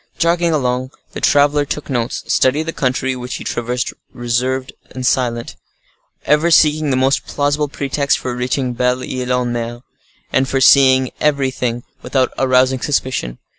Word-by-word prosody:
Jogging 170 0 +2
along, 130 -3 -1 0.2
the - - -7
traveler 145 0 +3
took 150 +1 -5
notes, 120 -3 -2
studied 140 +4 +2
the 165 +1 -5
country, 130 0 -1
which 125 0 -6
he - - -6
traversed 120 +1 -3 0.2
reserved 125 +2 -2 0.2
and 130 0 -6
silent, 120 -2 0 0.7
ever 150 +4 +3
seeking 155 -2 +4
the 130 - +1
most 135 +1 +1
plausible 145 +1 0
pretext 140 0 -1
for 125 -1 -4
reaching 125 +1 -1
Belle 125 +1 0
Ile 125 0 -1
en 120 -1 -2
Mer, 120 0 -4 0.5
and 130 +1 +2
for 135 - 0
seeing 130 -1 +5
everything 130 -5 0 0.2
without 130 -2 0
arousing 130 0 +2
suspicion. 130 - -2
130 Hz, 150 wpm, -17 LUFS, 125-145 Hz, 0.7 s, seeing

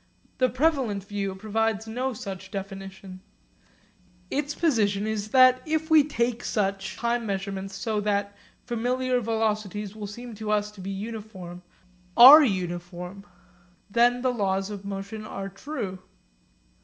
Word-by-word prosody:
The 255 -1 +4
prevalent 255 -8 +1
view 200 -1 -3
provides 220 +1 -1
no 250 +4 -2
such 195 -5 -7
definition. 195 -1 -8 1.1
Its 290 +1 -1
position 210 -11 +1
is 215 -1 -2
that 255 +1 +6
if 315 0 -2
we 310 -2 +8
take 240 -4 -1
such 195 -2 -1
time 235 0 0
measurements 195 0 -4
so 210 +2 -1
that 200 -1 0
certain 205 - -28 0.4
familiar 255 +1 +1
velocities 215 -2 -2
which 210 -2 -6
seem 240 +3 -8
to 215 0 -6
us 210 0 +1
to 205 -2 -12
be 190 - -5
uniform 195 -4 -7 0.6
are 270 +6 +12
uniform, 180 -2 -3 0.6
then 245 +2 +3
the 255 -1 +2
laws 195 -2 -1
of 200 -1 -7
motion 200 +2 -5
are 195 -2 -6
true. 195 -3 -5
210 Hz, 135 wpm, -26 LUFS, 195-240 Hz, 1.1 s, are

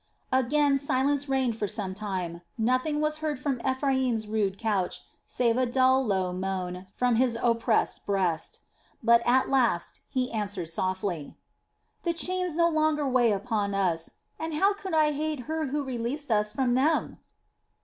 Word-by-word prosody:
Again 275 +2 +3
silence 280 +1 +1
reigned 260 -4 +1
for 210 - -1
some 195 -2 -2
time, 185 -4 -4 0.2
nothing 255 +6 +1
was 305 0 0
heard 310 -2 -2
from 255 -2 -2
Ephraim's 260 -4 0
rude 205 -3 0
couch 200 -5 -1 0.3
save 235 -1 +1
a 255 -1 +2
dull, 260 +2 +3
low 190 -5 0
moan 185 0 -4
from 245 +1 +1
his 245 -2 +2
oppressed 230 -1 +1
breast; 185 -5 -1 0.4
but 235 +1 +6
at 255 +2 +4
last 240 -10 +1
he 255 -1 -1
answered 205 -6 -3
softly: 185 -2 -3 0.6
"The 340 - 0
chains 360 0 -1
no 335 0 +4
longer 310 -2 +1
weigh 250 -3 +3
upon 205 -1 -1
us, 170 -4 0 0.3
and 320 -1 -3
how 390 +6 +3
could 385 -4 -4
I 305 -1 +4
hate 300 -1 -2
her 315 +3 -2
who 290 +2 -1
released 260 +2 -4
us 210 -1 +2
from 255 -1 +1
them?" 295 +6 +1
250 Hz, 155 wpm, -27 LUFS, 205-285 Hz, 0.6 s, but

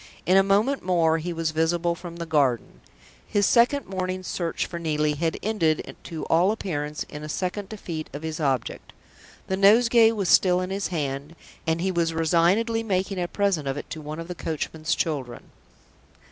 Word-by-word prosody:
In 185 - +4
a 195 - +7
moment 205 +8 +2
more 165 -3 +2
he 175 +3 -4
was 165 -1 -1
visible 170 +2 +1
from 170 0 -9
the 170 0 -5
garden. 140 -8 0 0.5
His 205 -1 +2
second 245 +5 +3
morning's 185 -1 -3
search 170 -2 -2
for 170 - -6
Neelie 150 -2 0
had 160 +2 -1
ended 170 -8 0
to 160 -2 -5
all 175 +5 +3
appearance 150 -8 -3
in 150 - -8
a 150 - -6
second 190 +4 -3
defeat 170 -7 -6
of 145 +3 -7
his 160 0 -4
object. 135 -5 -2 0.5
The 190 - -2
nosegay 225 +3 +6
was 200 -4 -2
still 180 0 +5
in 185 +1 -3
his 195 +1 -1
hand; 145 -2 -4 0.3
and 160 +1 +1
he 190 +1 0
was 165 -2 0
resignedly 180 +8 +2
making 190 -3 -1
a 175 - -1
present 190 -7 0
of 135 +1 -2
it - - -8
to 160 - -5
one 155 +2 -6
of 165 - -6
the 180 - -4
coachman's 160 -1 -3
children. 135 -7 -3
170 Hz, 185 wpm, -25 LUFS, 155-195 Hz, 0.5 s, a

